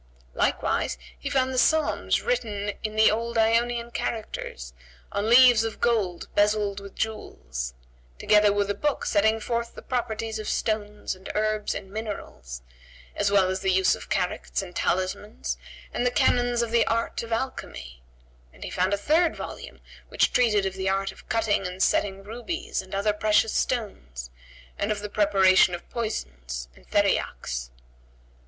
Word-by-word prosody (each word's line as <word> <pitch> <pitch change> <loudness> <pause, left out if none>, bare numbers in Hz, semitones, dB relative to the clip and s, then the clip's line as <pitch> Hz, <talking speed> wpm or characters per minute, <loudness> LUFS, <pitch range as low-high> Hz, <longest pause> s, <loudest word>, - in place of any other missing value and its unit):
Likewise - - 0 0.2
he - - -4
found 260 -1 +1
the 255 - +2
Psalms 315 +3 +2
written 210 - -1
in 215 0 -4
the 220 0 +6
old 230 +2 -2
Ionian[FN#142] 235 +1 +2
characters 60 - -4 0.4
on 205 +2 -1
leaves 245 -2 +7
of 225 -1 -4
gold 210 -7 0
bezel'd 205 -1 +2
with 200 0 -11
jewels; 60 - -4 0.4
together 210 - +4
with 205 0 +1
a - - 0
book 295 +5 -1
setting 220 +2 +3
forth 235 +1 -3
the - - -10
properties 225 -3 -2
of 215 - -4
stones 210 -1 -2
and 185 +1 -11
herbs 215 0 0
and 195 -1 -7
minerals, 65 - -6 0.5
as 205 -1 +1
well 200 -2 +4
as 190 - -2
the 190 - 0
use 190 0 +4
of - - -7
characts 185 +1 -1
and 180 -2 -10
talismans 65 - -1 0.4
and - - -1
the 250 - +3
canons 245 -1 +2
of 230 - -4
the 235 -1 +3
art 230 0 0
of 230 0 -8
alchymy; 65 - -4 0.5
and - - -12
he - - -5
found 185 +2 +1
a - - -6
third 315 - +2
volume - - -8 0.3
which - - +2
treated 210 -5 +3
of 190 - -1
the 190 0 -1
art 195 0 0
of - - -17
cutting 215 -4 +1
and 180 +1 -2
setting 195 -1 +1
rubies 245 - -4
and 190 +1 -8
other 205 +2 +1
precious 215 +1 +2
stones 65 - -3 0.5
and 205 +1 0
of 210 -1 -2
the 210 - -5
preparation 195 -3 +4
of 175 - -11
poisons - - -4
and - - -21
theriacks. - - 0
210 Hz, 160 wpm, -26 LUFS, 190-230 Hz, 0.5 s, leaves